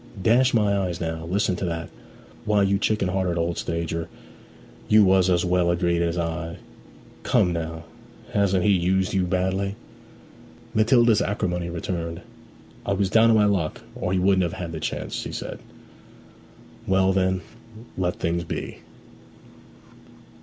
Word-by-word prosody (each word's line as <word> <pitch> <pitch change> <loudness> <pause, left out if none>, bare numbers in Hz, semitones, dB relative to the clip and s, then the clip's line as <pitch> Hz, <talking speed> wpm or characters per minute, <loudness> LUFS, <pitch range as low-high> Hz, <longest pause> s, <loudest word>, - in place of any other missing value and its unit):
'Dash 120 +7 +4
my 105 -3 +2
eyes 90 -4 -2
now; 80 -1 -4
listen 95 0 0
to - - -5
that! 85 -2 -3 0.6
Why, 105 -1 +3
you 100 0 +2
chicken 100 -2 0
hearted 90 -2 -1
old 85 0 -1
stager, 85 0 -3 0.8
you 105 0 +6
was 95 -1 +4
as 90 0 +2
well 90 -1 +2
agreed 85 -1 +1
as 85 0 0
I. 85 0 -3 0.6
Come 90 - +2
now; 80 -1 -4 0.5
hasn't 95 -2 +2
he 105 - +4
used 95 0 +1
you 95 -2 +1
badly?' 95 +2 -1 1.0
Matilda's 115 0 +4
acrimony 90 -3 -2
returned. 85 0 -4 0.6
'I 100 - -1
was 100 -1 0
down 115 0 +5
on 115 - +5
my 105 -1 +4
luck, 95 -5 0
or 105 -7 -3
he 95 - +1
wouldn't 95 +1 +3
have 85 -2 -1
had 85 -2 -5
the 80 - -5
chance!' - - -4
she - - -4
said. - - -6 1.3
'Well, 95 0 +3
then, 95 -1 +1 0.5
let 90 -1 -1
things 85 +1 -1
be.' 80 - -6
90 Hz, 145 wpm, -24 LUFS, 85-100 Hz, 1.3 s, you